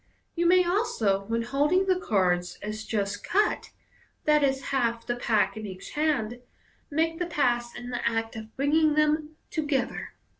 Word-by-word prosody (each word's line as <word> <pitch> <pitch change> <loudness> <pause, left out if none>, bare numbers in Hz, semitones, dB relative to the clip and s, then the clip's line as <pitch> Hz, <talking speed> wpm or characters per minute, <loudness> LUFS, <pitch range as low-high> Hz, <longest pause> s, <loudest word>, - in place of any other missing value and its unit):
You 340 0 +2
may 365 +1 +5
also, 235 - +1
when 230 +2 -1
holding 295 +10 +2
the 370 -1 +2
cards 180 - +1
as 215 +1 -5
just 205 -2 -2
cut 420 +3 +1 0.6
(i.e., 285 -3 +4
half 235 -3 0
the 240 - -1
pack 225 -3 +1
in 215 -1 -6
each 185 -1 -9
hand), 275 -7 0 0.5
make 325 +2 0
the 355 - -1
pass 240 -7 0
in 245 +1 -7
the 245 - -3
act 225 0 -2
of 220 0 -9
bringing 300 +2 +3
them 305 0 +1 0.2
together. 290 -5 -2
265 Hz, 155 wpm, -27 LUFS, 220-310 Hz, 0.6 s, may